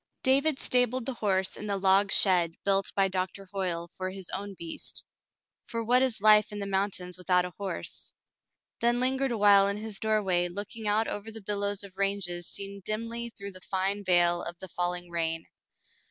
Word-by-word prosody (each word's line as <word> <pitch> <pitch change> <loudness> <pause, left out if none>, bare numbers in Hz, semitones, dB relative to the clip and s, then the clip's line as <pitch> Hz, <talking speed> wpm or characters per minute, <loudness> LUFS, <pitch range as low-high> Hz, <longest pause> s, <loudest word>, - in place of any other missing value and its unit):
David 275 +2 +4
stabled 250 -2 +1
the 265 - -2
horse 190 -5 0
in 210 - -6
the 200 -1 0
log 195 +1 +4
shed 175 -4 +4
built 195 -1 +2
by 195 -1 +3
Doctor 190 +1 -3
Hoyle 175 -3 -3
for 185 0 -3
his 190 -1 -7
own 200 +1 -5
beast, 165 -1 -6 0.3
— - - -64
for 230 0 -3
what 245 +3 +4
is 255 -4 +2
life 215 0 +6
in 210 - -5
the 200 - -3
mountains 190 -2 -1
without 180 0 +3
a 180 - -7
horse, 200 -2 -4 0.3
— - - -56
then 240 +1 +3
lingered 265 +1 +1
awhile 205 -3 +5
in 200 0 -1
his 215 -2 -3
doorway 200 -5 +1
looking 205 +4 -6
out 215 +2 +2
over 205 +2 -5
the 225 - -6
billows 205 0 -1
of 190 -1 -12
ranges 195 -4 -1
seen 200 0 -6
dimly 230 +3 -3
through 200 -3 -8
the 185 -1 -10
fine 195 +2 -1
veil 175 -2 +3
of 170 0 -6
the 190 +1 -8
falling 175 0 -3
rain. 165 -1 -1
200 Hz, 190 wpm, -28 LUFS, 185-215 Hz, 0.3 s, life